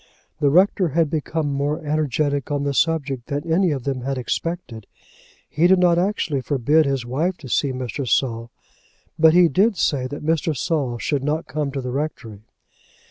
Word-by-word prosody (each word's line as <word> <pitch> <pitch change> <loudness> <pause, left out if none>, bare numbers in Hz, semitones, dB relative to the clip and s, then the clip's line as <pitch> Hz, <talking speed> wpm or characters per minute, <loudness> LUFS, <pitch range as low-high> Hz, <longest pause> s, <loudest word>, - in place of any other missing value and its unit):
The 145 - +3
rector 185 +3 +3
had 160 0 0
become 155 -1 -2
more 145 +2 -2
energetic 145 -2 -1
on 145 -1 -1
the 140 0 -1
subject 140 -5 0
than 145 +2 -3
any 185 +1 +3
of 140 -5 -2
them 135 -1 -2
had 135 +1 -3
expected. 125 - -4 0.6
He 165 +4 +2
did 190 +1 +5
not 175 -1 +3
actually 175 -7 -1
forbid 145 +3 +2
his 135 -3 -1
wife 160 +9 -1
to 140 - -11
see 135 +3 0
Mr. 130 +1 -4
Saul, 115 -2 0 0.7
but 160 +1 +6
he 180 -1 +7
did 195 - +2
say 135 -5 0
that 145 +3 -7
Mr. 160 -1 0
Saul 135 -5 -1
should 140 +2 -2
not 150 +3 -1
come 150 -2 -3
to 135 - -3
the 125 -1 -4
rectory. 135 -7 -5
145 Hz, 180 wpm, -22 LUFS, 135-160 Hz, 0.7 s, he